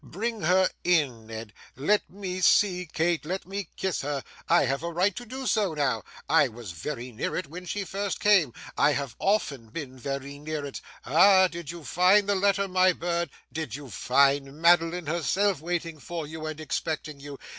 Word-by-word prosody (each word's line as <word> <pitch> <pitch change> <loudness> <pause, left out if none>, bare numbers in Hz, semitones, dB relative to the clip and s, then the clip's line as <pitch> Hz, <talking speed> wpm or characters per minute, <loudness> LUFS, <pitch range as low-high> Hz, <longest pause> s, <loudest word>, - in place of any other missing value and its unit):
'Bring 220 - -4
her 185 +3 +4 0.2
in, 140 -11 +1
Ned. 110 -1 -8 0.2
Let 205 +11 +1
me 185 -1 -5
see 180 -1 +4
Kate, 165 0 +1
let 185 +5 -4
me 195 -1 -5
kiss 190 -6 -1
her. 140 -1 -3 0.3
I - - +5
have 135 +1 -1
a 170 +1 -3
right 185 +4 +1
to 245 - -7
do 260 +3 -6
so 200 -9 +1
now; 130 -7 +1 0.3
I - - +5
was 115 -4 -9
very 125 - -5
near 110 - -3
it 185 - -2
when 175 +5 -9
she 205 +3 -2
first 200 +1 -3
came; 195 -10 +4 0.2
I 150 - +4
have 140 -4 -3
often 145 - 0
been 130 0 -7
very 140 +2 -5
near 150 0 -4
it. 140 - -7 0.2
Ah! 185 +6 +6
Did 170 -3 -8
you 170 -1 -7
find 185 +6 +4
the 205 - +3
letter, 200 0 +2
my 185 0 +4
bird? 170 0 -2 0.2
Did 155 -7 -4
you 140 -3 -9
find 140 - +2
Madeline 170 +1 +4
herself, 170 +3 +1
waiting 165 -1 -3
for 165 +1 -5
you 155 +1 -6
and 155 0 -5
expecting 155 -1 -3
you? 140 0 -8
165 Hz, 190 wpm, -27 LUFS, 140-185 Hz, 0.3 s, Ah